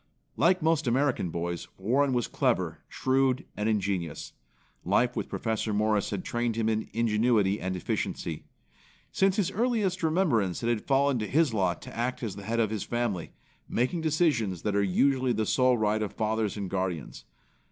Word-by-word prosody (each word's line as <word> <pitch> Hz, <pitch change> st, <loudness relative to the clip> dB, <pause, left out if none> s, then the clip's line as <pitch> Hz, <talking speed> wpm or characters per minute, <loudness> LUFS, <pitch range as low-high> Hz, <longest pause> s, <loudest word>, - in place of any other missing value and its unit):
Like 180 Hz, 0 st, +3 dB
most 160 Hz, -3 st, +2 dB
American 130 Hz, -6 st, +1 dB
boys, 85 Hz, +1 st, -4 dB
Warren 130 Hz, +8 st, +2 dB
was 120 Hz, -2 st, +1 dB
clever, -, -, 0 dB
shrewd 130 Hz, -1 st, +1 dB
and 105 Hz, +1 st, -1 dB
ingenious. 95 Hz, -7 st, -2 dB, 0.5 s
Life -, -, +2 dB
with -, -, -3 dB
Professor 110 Hz, -1 st, -2 dB
Morris 105 Hz, -1 st, +1 dB
had 100 Hz, -3 st, -3 dB
trained 120 Hz, -1 st, -1 dB
him 115 Hz, -1 st, 0 dB
in 110 Hz, 0 st, -1 dB
ingenuity 110 Hz, -2 st, +2 dB
and 95 Hz, 0 st, -3 dB
efficiency. 85 Hz, -2 st, -3 dB, 0.7 s
Since 195 Hz, -1 st, +2 dB
his 195 Hz, -3 st, 0 dB
earliest 215 Hz, -4 st, 0 dB
remembrance 155 Hz, -, +1 dB
it 115 Hz, -, +1 dB
had 115 Hz, -3 st, -1 dB
fallen 140 Hz, -1 st, +3 dB
to 110 Hz, -, -2 dB
his 155 Hz, -4 st, +2 dB
lot 95 Hz, -4 st, 0 dB
to -, -, -10 dB
act 120 Hz, +2 st, -2 dB
as 105 Hz, -5 st, -3 dB
the 100 Hz, -, -8 dB
head 115 Hz, +1 st, -1 dB
of 110 Hz, -2 st, +1 dB
his 110 Hz, -2 st, -2 dB
family, 120 Hz, -8 st, -2 dB, 0.4 s
making 130 Hz, +8 st, 0 dB
decisions 145 Hz, -, +1 dB
that 105 Hz, -, 0 dB
usually 130 Hz, +7 st, +2 dB
are -, -, +3 dB
the 110 Hz, 0 st, 0 dB
sole 125 Hz, +2 st, +3 dB
right 110 Hz, 0 st, +1 dB
of 105 Hz, -, -3 dB
fathers 110 Hz, -1 st, -1 dB
and 100 Hz, -2 st, -3 dB
guardians. 90 Hz, -5 st, -3 dB
115 Hz, 175 wpm, -28 LUFS, 100-135 Hz, 0.7 s, Like